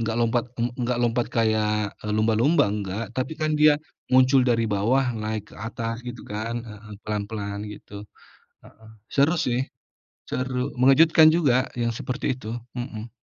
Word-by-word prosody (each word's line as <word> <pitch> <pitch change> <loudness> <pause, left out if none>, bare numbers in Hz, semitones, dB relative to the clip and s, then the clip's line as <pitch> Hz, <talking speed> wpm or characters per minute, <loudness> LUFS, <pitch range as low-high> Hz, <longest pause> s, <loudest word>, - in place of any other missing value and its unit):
nggak 115 0 -1
lompat 120 0 +1 0.2
ng 120 - +1
nggak 120 0 0
lompat 120 0 +1
kayak, 105 -2 +1
eee, 105 - -4
lumba-lumba 115 +9 +3
nggak, 100 +1 -3
tapi 130 +4 -2
kan 155 0 +1
dia 150 0 +6 0.4
muncul 130 +1 +6
dari 115 -2 +2
bawah 110 +7 +2
naik 110 -1 -3
ke - - -12
atas 115 +2 -4
gitu 120 -1 -7
kan, 115 +3 -3
heeh, 105 -2 -11
pelan-pelan 105 -1 -4
gitu, 105 0 -10 0.6
heeh. 110 0 -17 0.2
Seru 145 +4 +3
sih, 125 -6 0 0.7
seru, 130 +1 -2
mengejutkan 155 +5 +6
juga 130 -6 +2
yang 115 0 +1
seperti 130 +2 -2
itu. 110 -4 -8 0.2
Mhm. 120 -2 -6
115 Hz, 150 wpm, -24 LUFS, 110-130 Hz, 0.7 s, dia